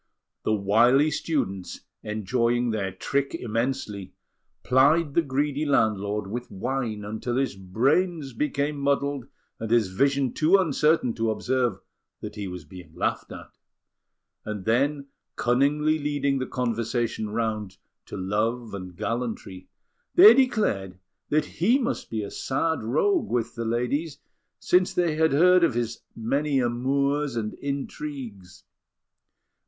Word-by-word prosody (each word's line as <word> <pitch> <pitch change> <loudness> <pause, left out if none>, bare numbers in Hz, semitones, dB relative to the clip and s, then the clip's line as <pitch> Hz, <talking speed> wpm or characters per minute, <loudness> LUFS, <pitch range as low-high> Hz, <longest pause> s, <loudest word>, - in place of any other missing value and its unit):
The 110 - +1
wily 120 +9 +4
students, 95 - -2 0.2
enjoying 115 +3 0
their 100 -3 -2
trick 140 - -2
immensely, 115 - -3 0.5
plied 140 +4 +3
the 170 - +4
greedy 145 0 -1
landlord 105 -7 +1
with 120 +5 -5
wine 110 0 -3
until 110 +3 -3
his 135 -4 0
brains 135 - 0
became 145 +3 -1
muddled 140 -1 0 0.3
and 115 - -4
his 115 -4 +3
vision 135 +6 +1
too 165 +5 +4
uncertain 155 -6 +2
to 115 0 -1
observe 120 -2 0 0.4
that 105 - -7
he 105 -2 -5
was 90 -3 -7
being 90 +3 -13
laughed - - -2
at; - - -11 0.8
and 105 -3 -5
then, 140 +5 +1 0.3
cunningly 145 +6 +2
leading 140 -2 0
the 130 - -3
conversation 115 -2 -2
round 110 -3 -3 0.3
to - - -7
love 110 +5 -1
and 90 -2 -7
gallantry, 110 -6 -4 0.5
they 205 +5 +10
declared 215 - +1 0.3
that 150 0 +2
he 210 - +2
must 260 -1 -3
be 110 -2 -3
a 100 - -6
sad 160 +4 -1
rogue 335 - +1
with 120 -2 -1
the 115 -1 -4
ladies, 125 +7 -1 0.4
since 180 0 +2
they 175 -3 +2
had 160 +1 +2
heard 180 +4 +5
of 170 - +2
his 120 -1 -2
many 140 +5 0
amours 140 +3 0
and 110 -2 -2
intrigues. 135 -9 -6
125 Hz, 130 wpm, -25 LUFS, 110-145 Hz, 0.8 s, they